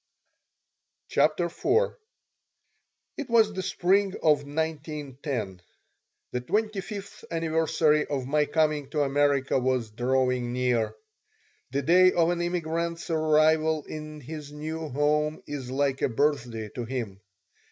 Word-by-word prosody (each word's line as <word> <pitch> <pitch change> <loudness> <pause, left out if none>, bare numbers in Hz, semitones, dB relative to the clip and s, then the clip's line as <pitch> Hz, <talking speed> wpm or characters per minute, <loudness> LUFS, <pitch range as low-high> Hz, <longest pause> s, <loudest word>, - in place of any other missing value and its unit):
CHAPTER 155 +4 +2
IV 430 - +1 1.3
IT 285 -4 -5
was 225 -2 +4
the 190 - -3
spring 190 +2 +1
of 150 -2 +4
1910. 145 - -4 0.7
The 125 - -2
twenty 210 - -1
fifth 200 0 -8
anniversary 160 -2 +2
of 135 -3 -2
my 150 +2 +2
coming 150 -2 +1
to 150 0 +1
America 140 -1 +2
was 125 -3 0
drawing 125 +1 0
near. 120 -4 0 0.7
The 140 +2 -1
day 185 +4 +6
of 170 0 +3
an 175 0 -1
immigrant's 170 -1 -2
arrival 155 0 +3
in 155 -1 -7
his 150 +1 -8
new 155 +1 -5
home 150 +2 0
is 140 -4 -6
like 135 0 0
a - - +2
birthday 115 -4 0
to 120 - -5
him. 115 -6 -5
150 Hz, 120 wpm, -27 LUFS, 130-165 Hz, 1.3 s, day